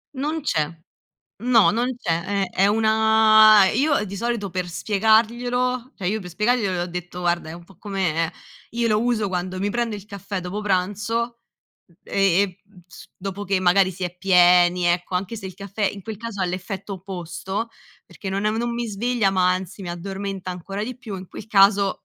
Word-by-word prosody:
Non 300 +4 -2
c'è. 160 - +1 0.8
No, 235 -3 +5
non 240 +3 -1
c'è. 170 -7 -1 0.2
È - - -9
è 195 - +2
una 220 -1 +6
e 215 - 0
io 285 -6 +2
di 200 -1 -7
solito 230 -2 -2
per 180 0 -3
spiegarglielo 235 - +1
cioè, 185 - -5
io 215 +4 0
per 180 - -8
spiegarglielo, 210 +2 +1
le 180 - -1
ho - - -3
detto: 180 0 -6
"Guarda 175 -2 0
è - - -7
un 170 +1 -10
po' 190 +1 -19
come" 180 -5 -1 0.4
io 235 0 -1
lo 215 -1 +2
uso 235 -3 +1
quando 185 0 -3
mi 200 +2 -1
prendo 235 -1 -1
il 200 - -11
caffè 200 -1 -6
dopo 180 +4 -5
pranzo 210 +4 -1 0.5
m 170 - -25
e 195 -1 +3
e 185 -3 -4 0.3
s - - -14
dopo 195 +1 -5
che 195 0 +1
magari 185 +1 +4
si 185 0 -5
è 180 0 -5
pieni, 180 -1 +4
ecco, 175 +1 +1
anche 195 +5 -3
se 200 -3 -7
il 185 - -8
caffè 200 +2 -7
in 200 - -10
quel 220 +2 -6
caso 225 -2 -6
ha - - +2
l'effetto 185 +2 -5
opposto, 190 +3 -5 0.4
perché 200 - -8
non 195 +2 -2
è 210 - +3
un 220 - -2
non 235 +1 -1
mi 235 0 -2
sveglia, 225 0 0
ma 185 -1 +3
anzi, 185 +2 -5
mi 180 - -6
addormenta 195 +1 -5
ancora 195 +4 -5
di 250 +1 -6
più, 230 -6 -7
in 185 0 -9
quel 200 - -10
caso, 195 -1 +4
200 Hz, 200 wpm, -23 LUFS, 180-220 Hz, 0.8 s, una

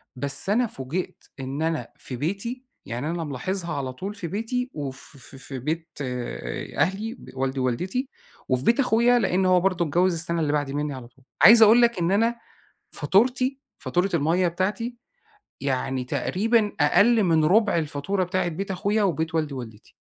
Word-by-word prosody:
بس 140 +8 -1
أنا 235 +4 +3
فوجِئت 145 +4 -5 0.2
إن 135 +3 -4
أنا 160 0 -1
في 125 - -7
بيتي 200 - -3 0.2
يعني 125 +7 -4
أنا 170 -1 -2
ملاحظها 170 +5 -3
على 130 -3 -3
طول 195 +10 -6
في 200 -5 -6
بيتي 230 +7 -2
وف 140 -1 -7
في 135 +1 -13
في 135 -1 -7
بيت 160 +5 -3
آآ 125 - -5
أهلي، 210 +5 0
ب - - -14
والدي 135 0 -2
ووالدتي 185 - -1 0.4
وفي 130 -1 +1
بيت 235 +4 +3
أخويا 245 -1 +4
لأن 190 -4 +1
هو 185 -1 +5
برضه 180 -2 +1
اتجوّز 175 +4 +2
السَّنة 170 +1 0
اللي 150 -1 0
بَعد 145 -2 -1
مِنّي 145 0 -2
على 130 -2 -8
طول، 130 +2 -26 0.2
عايز 225 +5 +9
أقول 225 +3 +8
لك 235 -4 +3
إن 170 +1 +1
أنا 230 +4 +2 0.6
فاتورتي 255 +6 +1 0.2
فاتورة 175 +7 0
المَيّة 170 +3 +2
بتاعتي 210 +8 -2 0.6
يعني 130 -1 -1
تقريبًا 210 - +1
أقل 230 0 +4
من 160 -3 +3
رُبع 205 +4 +4
الفاتورة 160 +5 -1
بتاعت 180 -1 -1
بيت 195 +5 -4
أخويا 205 +3 0
وبيت 160 -3 -1
والدي 155 -3 -1
ووالدتي. 115 -5 -9
175 Hz, 170 wpm, -25 LUFS, 140-210 Hz, 0.6 s, عايز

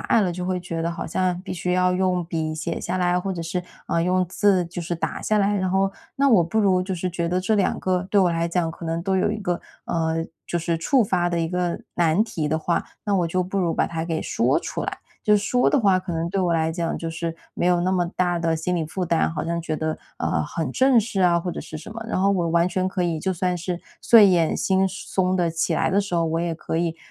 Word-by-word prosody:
隘 230 - +2
了， 190 -4 +1
就 180 +1 -4
会 180 0 -1
觉 170 -2 -4
得 170 - 0
好 - - -5
像 180 +1 0
必 195 - -6
须 180 0 -2
要 180 0 +3
用 180 -1 +1
笔 160 -2 -2
写 155 - -3
下 180 - -2
来， 180 0 +2
或 190 +2 -2
者 170 -2 -4
是， 170 +2 -3 0.3
呃， 165 - +1
用 185 +1 +2
字 190 -1 +2
就 175 +1 -6
是 170 +1 -3
打 165 - -3
下 215 - +2
来， 205 0 +2
然 185 -1 0
后 195 +1 +2 0.3
那 280 +1 +3
我 210 -9 +5
不 195 +7 0
如 190 -3 +3
就 190 +1 -3
是 180 +1 -2
觉 170 -1 -2
得 180 +2 0
这 200 +4 +1
两 200 -2 +1
个 185 -1 0
对 205 - +4
我 180 -2 +4
来 165 0 0
讲 170 -1 0
可 170 - -10
能 165 +1 -2
都 190 +2 0
有 190 - +2
一 215 - -3
个， 180 -4 -2 0.3
嗯， 165 -1 -1 0.2
就 175 - -1
是 170 0 -1
触 255 - +3
发 180 -4 +1
的 170 -1 -1
一 165 - -1
个 180 0 -1
难 170 +3 +3
题 170 -9 -3
的 155 +2 0
话， 170 +2 0 0.2
那 205 -2 +1
我 175 -2 +1
就 185 +2 0
不 190 +2 -3
如 170 -3 +1
把 - - +1
它 165 -1 -3
给 165 -1 -2
说 - - +1
出 - - -4
来。 - - -4 0.2
就 210 0 +4
说 245 +5 +2
的 290 - +3
话， 195 -6 +4
可 185 -1 -5
能 165 +1 -1
对 195 - 0
我 175 -2 +1
来 160 0 +1
讲 170 0 -2
就 165 - -4
是 165 0 -4 0.2
没 - - -1
有 175 -1 +3
那 185 +1 +1
么 180 -2 +1
大 175 -1 +1
的 165 -1 +1
心 180 +3 -1
理 160 -3 -1
负 185 +3 -3
担， 170 -2 +1
好 160 - -3
像 170 +1 -1
觉 160 -2 -3
得， 155 0 -2 0.2
嗯， 75 - 0
很 135 - -3
正 260 -1 +4
式 215 -2 -1
啊 175 -2 +4
或 175 +1 -3
者 - - -5
是 155 - -8
什 155 - -9
么。 225 +1 -6
然 230 - -1
后 195 +1 +4
我 175 -4 +1
完 170 +1 +3
全 185 +1 0
可 185 -1 -2
以， 170 -3 -1
就 190 - -1
算 180 0 0
是 175 0 -4 0.2
睡 225 -3 +7
眼 175 -4 +3
惺 190 0 +2 0.2
忪 185 -1 +2
地 175 -2 +1
起 165 0 0
来 - - +1
的 200 - +3
时 195 -3 -4
候， 170 -1 +2
我 165 +1 0
也 170 -1 -1
可 160 0 -3
以， 165 -1 -1
180 Hz, 295 characters per minute, -23 LUFS, 165-190 Hz, 0.3 s, 睡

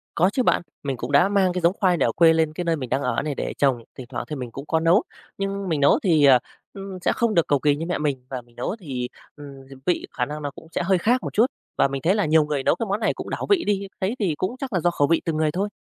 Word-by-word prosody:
Có 180 +3 +4
chứ 255 - +1
bạn, - - +2 0.2
mình 135 -3 -2
cũng 120 +4 -5
đã 145 +7 +5
mang 195 -3 +2
cái 180 - -2
giống 170 +2 +3
khoai 185 -4 +3
này - - +2
ở 115 - +1
quê 165 +3 +5
lên 160 -1 +1
cái 175 - -4
nơi 165 -1 +1
mình 130 -5 -6
đang 135 - 0
ở - - 0
này 145 -1 -3
để - - -3
trồng, 130 -5 +1
thỉnh 125 -2 -8
thoảng - - -4
thì 150 - -4
mình 125 -3 -6
cũng 135 +4 -8
có 160 +1 +1
nấu, 165 +5 +4 0.3
nhưng 195 -1 -3
mình 155 - 0
nấu 140 - +5
thì, 160 -7 +4 0.5
ừm, 195 -1 -7
sẽ - - +2
không 235 -2 +1
được 170 - +2
cầu 145 -2 +2
kỳ 145 +1 +2
như 160 +3 -4
mẹ 180 - -1
mình 140 -4 -2
và 130 -2 -4
mình 120 0 -26
nấu 125 - -3
thì, 130 -8 -4 0.3
ừm, 140 -2 -11
h - - -10
vị 175 - 0
khả 125 - -1
năng 150 +2 -6
nó 145 -1 -4
cũng 160 - -14
sẽ - - -1
hơi 190 0 +3
khác 245 +8 +1
một - - -5
chút. 225 +4 +5 0.3
Và - - +4
mình 135 0 -4
thấy 180 +8 +2
là 210 - +1
nhiều 155 0 +4
người 145 -2 -2
nấu - - +3
cái 230 - -3
món 200 +3 0
này 220 - +1
cũng - - -7
đảo - - -3
vị 385 -4 +4
đi, 200 -1 -1
thế 195 +5 0
thì 175 -7 0
cũng 190 +7 -2
chắc 260 -5 -5
là 180 - +2
do 175 +1 +2
khẩu 145 -4 +1
vị 165 - +2
từng 160 -2 -1
người 155 -1 +1
thôi. 195 +5 -2
160 Hz, 315 wpm, -23 LUFS, 140-190 Hz, 0.5 s, đã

